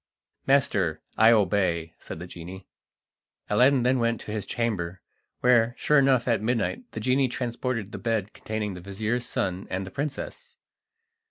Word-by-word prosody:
"Master, - - +2 0.2
I 110 +1 +6
obey," 95 -6 +2
said - - -8
the 85 - -7
genie. 90 +2 -9 0.9
Aladdin 125 +4 +5
then 125 +1 +3
went 115 -1 +1
to - - -7
his 105 -2 -3
chamber, 95 -7 -2 0.4
where, 120 -1 +4
sure 150 -1 +4
enough 135 -3 +3
at 115 -3 +2
midnight 125 - -1
the - - -4
genie 130 +4 +2
transported 120 -3 -3
the - - -6
bed 110 -3 -1
containing 105 -2 -4
the 90 - -8
vizir's 110 +6 -2
son 95 -5 -2
and 95 +1 -2
the 95 - -9
princess. 150 - -5
110 Hz, 155 wpm, -26 LUFS, 95-125 Hz, 0.9 s, I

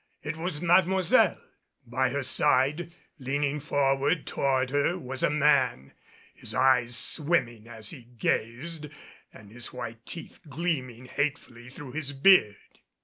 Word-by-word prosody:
It 150 +2 -4
was 165 -1 -4
Mademoiselle! 185 +1 +3 0.5
By 130 +2 0
her 140 +2 -2
side, 145 +5 +1 0.3
leaning 140 +2 -1
forward 140 +1 +1
toward 130 -2 0
her, 145 +5 +1
was 135 -5 -5
a - - +3
man, 150 - +2 0.4
his - - -5
eyes 125 -2 +3
swimming 120 -6 0
as 110 -3 -6
he 125 - -11
gazed 145 +9 -1 0.4
and 105 -2 -15
his 120 +1 -5
white 115 -2 -7
teeth 170 - -5
gleaming 130 -6 -3
hatefully 130 -3 -4
through 135 0 -10
his 145 0 -3
beard. 135 - +3
135 Hz, 130 wpm, -27 LUFS, 125-150 Hz, 0.5 s, Mademoiselle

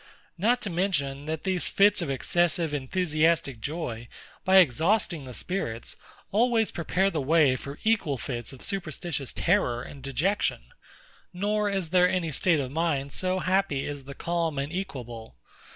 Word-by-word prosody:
Not 230 +8 +1
to 200 - -3
mention, 145 -6 -1
that 160 0 -3
these 185 -2 0
fits 200 0 +4
of 165 - -2
excessive, 165 +4 +1
enthusiastic 155 -2 +1
joy, 120 -4 -4 0.4
by 190 - +3
exhausting 170 - +3
the 125 - -8
spirits, 120 -12 -3 0.4
always 225 0 +2
prepare 185 +3 0
the 155 - -1
way 145 -2 +4
for 140 +3 -7
equal 210 -11 +1
fits 120 -2 -4
of 135 - -8
superstitious 170 -6 -3
terror 145 -10 +1
and 140 - -10
dejection; 145 +10 -1 0.6
nor 205 +3 0
is 195 -5 -1
there 180 +1 +5
any 175 -4 -1
state 165 +2 +2
of 130 -2 -3
mind 145 -3 0
so 185 +4 -1
happy 185 -6 +1
as 145 -2 -6
the 140 0 -9
calm 165 -2 -1
and 140 +4 -3
equable. 120 - -6
165 Hz, 150 wpm, -27 LUFS, 140-185 Hz, 0.6 s, there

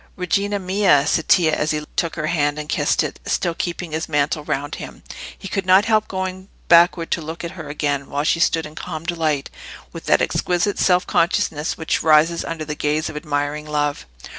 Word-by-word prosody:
"Regina 200 +3 0
mia!" 190 -6 +3
said 165 - 0
Tito, 160 -4 +4
as 150 - -1
he 150 -1 -1
took 170 - -1
her 155 - -2
hand 145 -2 0
and 150 0 -5
kissed 150 +1 +1
it, 150 - -5
still 170 -2 0
keeping 170 0 -4
his 160 +2 -3
mantle 150 0 0
round 145 0 -3
him. - - -10 0.3
He - - -8
could 195 0 -2
not 190 +3 +6
help 215 -1 +2
going 185 0 -4 0.2
backward 170 0 +5
to 170 - 0
look 160 +2 -7
at 170 - -4
her - - -9
again, 145 -2 -2
while 145 +1 -1
she 165 - +1
stood 165 -1 +2
in 150 - -10
calm 160 -1 -6
delight, 160 -4 -1 0.4
with - - -9
that - - +4
exquisite 180 +3 0
self 180 -1 +3
consciousness 160 -3 0
which 160 - -1
rises 160 +2 +4
under 165 -1 -5
the 150 - -4
gaze 150 +1 -1
of - - -13
admiring 150 0 -2
love. 145 - -1
160 Hz, 200 wpm, -21 LUFS, 150-175 Hz, 0.4 s, not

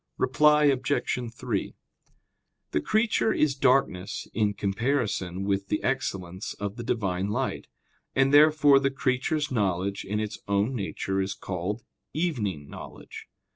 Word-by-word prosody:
Reply 150 0 +4
Obj. 135 -2 +1
3: 120 -4 -3 1.0
The 75 - +1
creature 220 - +2
is 150 -7 +2
darkness 125 -8 +1
in 105 -2 +1
comparison 100 -3 -1
with 100 0 -1
the 105 - -1
excellence 95 -8 -2
of 100 0 -4
the 120 - -6
Divine 100 -5 -1
light; 105 - -2 0.5
and 135 +1 +3
therefore 150 -1 +7
the 135 0 +1
creature's 135 +3 -1
knowledge 100 -4 0
in 105 +2 -2
its 110 -1 -4
own 100 +5 +1
nature 95 -3 -2
is 95 +1 -2
called 95 +5 -4 0.3
"evening" 110 - -2
knowledge. - - -10
110 Hz, 130 wpm, -27 LUFS, 100-135 Hz, 1.0 s, therefore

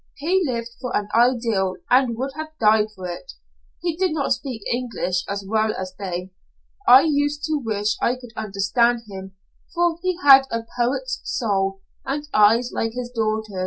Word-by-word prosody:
He 355 +7 +1
lived 235 -2 -3
for 250 -2 -1
an 210 0 -4
ideal 230 -6 +2 0.2
and 250 -2 +3
would 265 +3 -3
have 310 0 -7
died 215 -1 +4
for 185 -1 -6
it. 175 -1 -8 0.5
He 340 -2 -1
did 365 -1 0
not 280 -4 +1
speak 250 -3 -6
English 230 -7 -2
as 200 0 -4
well 215 +1 +1
as 185 -1 -5
they. 185 -1 -5 0.6
I 255 +2 +9
used 290 -1 0
to 310 -2 -1
wish 210 -1 -1
I 245 - +2
could 245 -2 -13
understand 220 +4 +1
him, 190 -1 -9 0.4
for 340 -1 +1
he 370 -2 -1
had 270 -1 +8
a 230 0 -3
poet's 260 - -1
soul, 195 -4 -1 0.2
and 290 +2 -3
eyes 225 +4 +4
like 225 0 -2
his 245 0 -5
daughter's. 215 -4 -2
235 Hz, 170 wpm, -22 LUFS, 205-275 Hz, 0.6 s, I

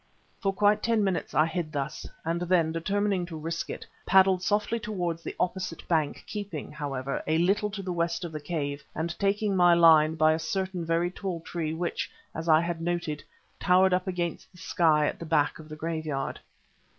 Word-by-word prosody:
For 195 - +1
quite 205 +2 +3
ten 230 -2 +2
minutes 190 -3 -1
I 155 - +5
hid 165 -1 -3
thus, 140 -1 -4 0.2
and 165 +1 -1
then, 175 -2 +2
determining 195 +3 0
to 165 -2 -7
risk 165 +2 -4
it, - - -6 0.2
paddled 190 -1 +5
softly 210 +4 0
towards 175 -6 -3
the - - -6
opposite 185 -1 -2
bank 155 -4 0
keeping, 200 -10 -6
however, 140 -3 -3
a 155 +1 +2
little 195 +5 +2
to 200 -1 -6
the 185 -1 -3
west 170 +1 -1
of 170 - -6
the 155 - -5
cave 145 -2 -3
and 170 +2 -2
taking 200 0 +1
my 175 -1 +6
line 160 -2 +6
by 155 0 +4
a 160 - -1
certain 185 +2 -2
very 165 +2 +1
tall 185 -2 -4
tree 160 -1 -3
which, 170 +1 -2 0.2
as 165 +1 -4
I 155 0 +6
had 170 -1 -3
noted, 170 -3 -2 0.4
towered 185 0 +4
up 180 +1 0
against 175 -2 -3
the - - -19
sky 160 -3 +2
at - - -2
the - - -6
back 150 -2 +1
of 155 -1 -12
the 155 - -7
graveyard. 155 -3 -3
170 Hz, 195 wpm, -28 LUFS, 160-185 Hz, 0.4 s, my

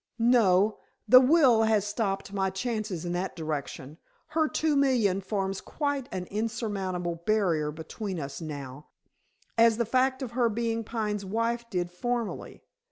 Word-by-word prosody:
"No. 220 -4 +3 0.3
The 255 - +9
will 260 -5 +5
has 220 -2 +2
stopped 200 -2 -2
my 190 -1 0
chances 210 -3 -3
in 175 - -2
that 180 +2 -3
direction. 155 -2 -5 0.3
Her 315 0 +1
two 310 -2 +1
million 240 -9 +2
forms 195 -1 -2
quite 285 -4 -3
an 185 -1 -4
insurmountable 200 -6 -2
barrier 180 -8 +2
between 175 +5 -6
us 140 0 -6
now, 145 -2 -7 0.7
as 230 -1 +6
the 235 - +1
fact 260 +3 +1
of 245 - -5
her 240 -1 +2
being 230 +1 -1
Pine's 210 -2 -3
wife 230 +4 -2
did 175 -3 -2
formerly. 240 +4 -4
210 Hz, 145 wpm, -28 LUFS, 180-235 Hz, 0.7 s, The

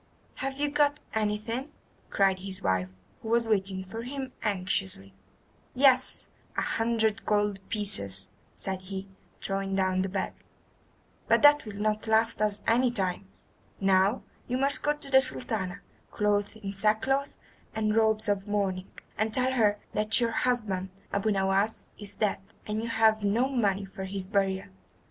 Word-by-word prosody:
"Have 270 +1 -3
you 295 - +2
got 295 0 +2
anything?" 220 +5 -2 0.4
cried 195 -1 +2
his 190 0 -5
wife, 95 -1 +1 0.3
who - - -8
was 235 0 +2
waiting 195 -3 0
for 225 +5 -7
him 265 +1 -5
anxiously. 185 - -2 0.6
"Yes, 260 -1 +4 0.3
a - - +1
hundred 225 -1 0
gold 205 -1 +1
pieces," 195 - +1 0.3
said 190 -1 -3
he, 190 +1 -6 0.4
throwing 195 0 -2
down 185 -1 +1
the 190 - -1
bag, 190 0 -2 0.9
"but - - +3
that 290 -2 +7
will 205 -1 -7
not 215 +1 -1
last 220 0 +2
us 210 -1 0
any 245 +2 +3
time. 195 -4 -2 0.5
Now 195 +3 +3 0.2
you 250 - -1
must 275 +2 +3
go 295 - +2
to 285 -2 -9
the 265 0 +7
Sultana, 200 -7 -3 0.3
clothed 205 0 0
in 200 -2 -6
sackcloth 220 +8 +1 0.4
and 215 -1 0
robes 220 0 +2
of 200 0 0
mourning, 195 -3 -1 0.3
and 215 +1 +1
tell 255 +3 +2
her 210 -4 +3 0.2
that 215 +2 +3
your 235 -1 +1
husband, 215 -7 -1 0.2
Abu 200 +2 +1
Nowas, 195 +1 +1
is 205 -1 -8
dead, 210 -3 0 0.3
and 215 +1 -2
you 230 - -4
have 220 -1 +3
no 225 +6 +2
money 205 -7 0
for 195 0 -7
his 190 0 -3
burial. 195 -1 0
210 Hz, 155 wpm, -28 LUFS, 195-230 Hz, 0.9 s, that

